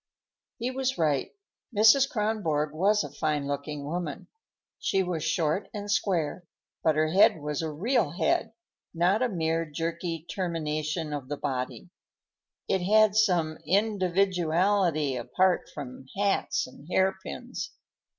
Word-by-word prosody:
He 245 +2 -2
was 265 0 -1
right; 150 -5 +1 0.5
Mrs. 225 +6 +6
Kronborg 190 - 0
was 200 +5 +3
a 145 - -7
fine 150 -1 -1
looking 145 +1 -4
woman. 165 +1 -4 0.5
She 195 - +1
was 175 -4 -3
short 165 +4 0
and 205 0 -4
square, 175 -4 0 0.4
but 160 -2 +3
her 155 0 +2
head 175 -1 +5
was 150 0 -3
a 160 - -2
real 190 - +1
head, 220 +7 0 0.4
not 180 +6 +3
a 255 - +2
mere 165 -3 0
jerky 165 +1 -4
termination 155 -3 -2
of 140 -3 -5
the 145 - -3
body. 130 -3 -4 0.8
It 190 - +1
had 210 +2 +4
some 175 -7 +2
individuality 185 -4 +2
apart 185 +9 +1
from 130 -2 -8
hats 200 0 +1
and 135 +3 -14
hairpins. 190 +1 -1
170 Hz, 130 wpm, -28 LUFS, 150-200 Hz, 0.8 s, Mrs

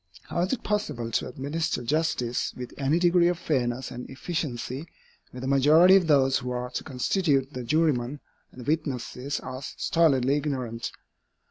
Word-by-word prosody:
How - - -4
is 185 - 0
it 265 - -2
possible 150 - -2
to - - 0
administer 140 +3 -2
justice 135 -3 -1
with 125 -1 -7
any 140 +3 +1
degree 175 0 +4
of 175 -1 +1
fairness 125 -6 -1
and 125 - -7
efficiency, 135 -1 -4 0.4
where 125 - -9
the 130 - -3
majority 155 +7 +6
of 185 -4 +4
those 135 -3 +4
who 125 - -5
are 125 0 -3
to - - -4
constitute 140 0 0
the 125 - -5
jurymen 145 -2 +1 0.3
and 125 - -11
the 120 - -11
witnesses 140 -3 -2
are 130 +1 -6
stolidly 140 -2 +2
ignorant? 130 -6 -3
140 Hz, 160 wpm, -27 LUFS, 125-160 Hz, 0.4 s, majority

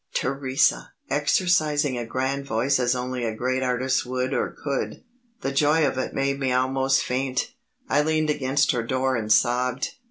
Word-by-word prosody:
Theresa! 130 - 0 0.2
exercising 150 -2 +2
a 120 -1 -4
grand 130 +3 -2
voice 125 +4 +1
as 125 0 +2
only 125 0 -3
a 110 -2 -2
great 130 +3 -1
artist 130 0 0
would 130 +1 -2
or - - 0
could. 140 -2 -4 0.4
The 135 - -2
joy 150 +3 +3
of 130 - -1
it - - -3
made 140 0 0
me 135 -2 0
almost 130 +1 +2
faint. 130 - -2 0.3
I 145 - +3
leaned 155 0 +1
against 140 0 +1
her 120 - -1
door 130 +2 0
and 110 -2 -2
sobbed. 125 +3 +2
130 Hz, 165 wpm, -24 LUFS, 125-140 Hz, 0.4 s, joy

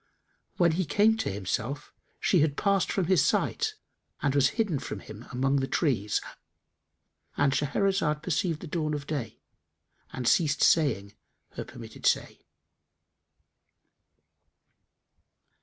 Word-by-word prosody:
When 170 -2 +4
he 180 +4 0
came 210 +9 +3
to - - -1
himself, 110 +9 -3 0.3
she 180 - +3
had 150 -1 +1
passed 200 -2 +2
from 190 - 0
his 185 +1 +4
sight 440 -2 0 0.4
and 140 - 0
was 140 -2 +4
hidden 195 -11 +1
from 105 - -6
him 110 +2 -11
among 135 +2 +1
the 135 -1 0
trees;——And 135 - -3
Shahrazad 150 +2 0
perceived 170 -2 -1
the 175 - -7
dawn 155 -1 -1
of 145 -1 -5
day 145 -7 -5 0.7
and 125 -2 -4
ceased 145 -2 +3
saying 105 -11 +3 0.4
her - - -5
permitted - - -6
say. - - 0
150 Hz, 120 wpm, -28 LUFS, 135-175 Hz, 0.7 s, When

